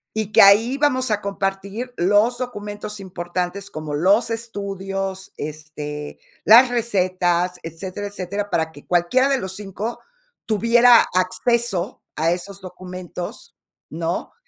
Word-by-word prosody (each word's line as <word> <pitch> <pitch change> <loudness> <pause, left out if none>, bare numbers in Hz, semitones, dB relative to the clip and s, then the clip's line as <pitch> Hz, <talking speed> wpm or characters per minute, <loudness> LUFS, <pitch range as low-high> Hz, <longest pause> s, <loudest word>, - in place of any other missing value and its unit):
y 215 -1 -3
que - - +7
ahí 210 +5 +7
íbamos 270 -3 +1
a 210 -1 0
compartir 200 +4 -3
los 205 +6 +3
documentos 210 -4 -5
importantes 180 +2 -4
como 155 -1 -6
los 200 +9 +3
estudios, 195 -4 -4
este, 150 -1 -6 0.2
las 240 +4 +8
recetas, 185 -6 0
etcétera, 185 +5 -6
etcétera, 200 +1 -4
para 160 0 0
que 145 - -14
cualquiera 180 +10 +2
de 275 - +2
los 190 -4 -5
5, 210 +3 -5 0.5
tuviera 230 +2 +5
acceso 195 +2 0
a 165 +2 +2
esos 195 +2 -7
documentos, 180 -1 -8 0.3
¿no? 165 +2 -3
195 Hz, 120 wpm, -21 LUFS, 180-225 Hz, 0.5 s, las